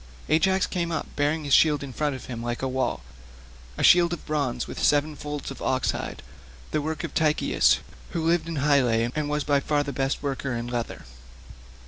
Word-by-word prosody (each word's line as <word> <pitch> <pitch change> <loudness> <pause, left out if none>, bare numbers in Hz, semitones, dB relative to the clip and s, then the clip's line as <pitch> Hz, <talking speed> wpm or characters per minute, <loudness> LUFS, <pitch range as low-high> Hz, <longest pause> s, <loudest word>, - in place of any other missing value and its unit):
Ajax 190 +5 +3
came 170 -2 -2
up 160 - -2
bearing 150 +2 0
his 140 -2 -1
shield 150 -3 +5
in 135 -2 -7
front 150 0 -1
of 130 - -9
him 120 -2 -6
like 120 +1 -3
a - - +1
wall—a 60 - -6
shield 175 -1 +6
of 175 - -7
bronze 140 -6 -1
with - - -7
seven 150 +1 +3
folds 145 -1 -5
of 135 - -9
ox 130 -1 +1
hide—the - - -7
work 155 0 -3
of - - -5
Tychius, 155 -1 +3 0.3
who 165 -2 -3
lived 165 -1 +2
in 165 - -4
Hyle 140 -2 +3
and 120 +6 0
was 150 0 0
by 145 -1 +2
far 145 +1 0
the 140 -1 -5
best 135 +2 -1
worker 135 -2 -2
in 115 0 -3
leather. 120 - -4
140 Hz, 190 wpm, -25 LUFS, 120-155 Hz, 0.3 s, shield